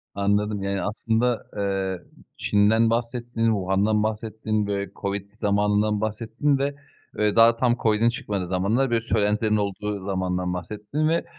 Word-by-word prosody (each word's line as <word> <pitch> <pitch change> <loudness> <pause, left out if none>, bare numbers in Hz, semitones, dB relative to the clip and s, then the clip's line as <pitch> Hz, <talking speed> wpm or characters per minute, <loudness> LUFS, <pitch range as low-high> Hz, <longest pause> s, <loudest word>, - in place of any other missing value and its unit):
Anladım, 100 0 0
yani 100 0 -1
aslında, 115 +3 0
eee, 95 -2 -1 0.4
Çin'den 110 +2 +3
bahsettin, 115 0 -1
Wuhan'dan 105 0 +2
bahsettin, 110 -1 -2
böyle, 100 -1 -2
COVID 100 0 -3
zamanından 105 0 +1
bahsettin 115 +6 0
ve 140 +1 -1 0.4
ve 105 -1 +1
daha 115 0 +6
tam 120 0 +2
COVID'in 110 +1 +3
çıkmadığı 100 -5 -3
zamanlar 100 +9 +1
böyle 115 -1 +2
söylentilerin 105 +1 +1
olduğu 100 -1 -3
zamandan 90 -2 -1
bahsettin 105 - -3
ve, 170 +1 +1
105 Hz, 130 wpm, -24 LUFS, 100-115 Hz, 0.4 s, daha